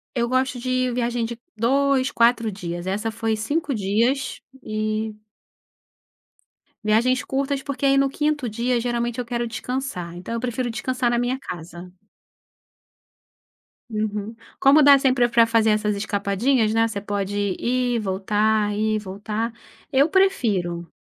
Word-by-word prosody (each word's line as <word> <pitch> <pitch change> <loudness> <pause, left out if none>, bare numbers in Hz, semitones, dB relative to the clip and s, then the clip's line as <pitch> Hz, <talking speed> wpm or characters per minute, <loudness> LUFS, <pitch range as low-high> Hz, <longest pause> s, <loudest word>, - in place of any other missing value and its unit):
Eu 235 -1 +1
gosto 255 0 0
de 255 0 0
viagem 240 -1 -1
de 235 +1 -6 0.2
2, 265 +3 +2
4 235 -2 +3
dias. 175 -1 -6
Essa 210 +4 -1
foi 225 0 -1
5 285 +6 -1
dias, 230 +7 0 0.2
e 215 0 -2 1.7
Viagens 240 +4 +2
curtas, 275 0 -1
porque 280 0 -3
aí 275 0 +4
no 275 0 +4
5º 295 -2 -1
dia, 235 +3 0
geralmente 240 0 -2
eu 245 - -2
quero 235 0 -2
descansar, 230 -8 -4
então 185 +6 -6
eu 230 - -1
prefiro 245 0 -2
descansar 255 +1 -1
na 240 - +1
minha 245 +2 0
casa. 175 -4 -9 2.0
Uhum. 215 0 -3 0.2
Como 280 +2 +6
dá 280 -1 +8
sempre 255 -3 +3
pra 230 -1 +4
fazer 225 -1 +3
essas 210 -1 +1
escapadinhas, 215 +3 +1
né, 225 0 +3
você 205 -3 -5
pode 205 -1 -2
ir, 245 -1 0
voltar, 210 +2 +1
ir 215 +1 +1
e - - 0
voltar, 210 +3 -4 0.4
eu 275 +3 +4
prefiro. 200 - +1
230 Hz, 140 wpm, -23 LUFS, 210-255 Hz, 2.0 s, dá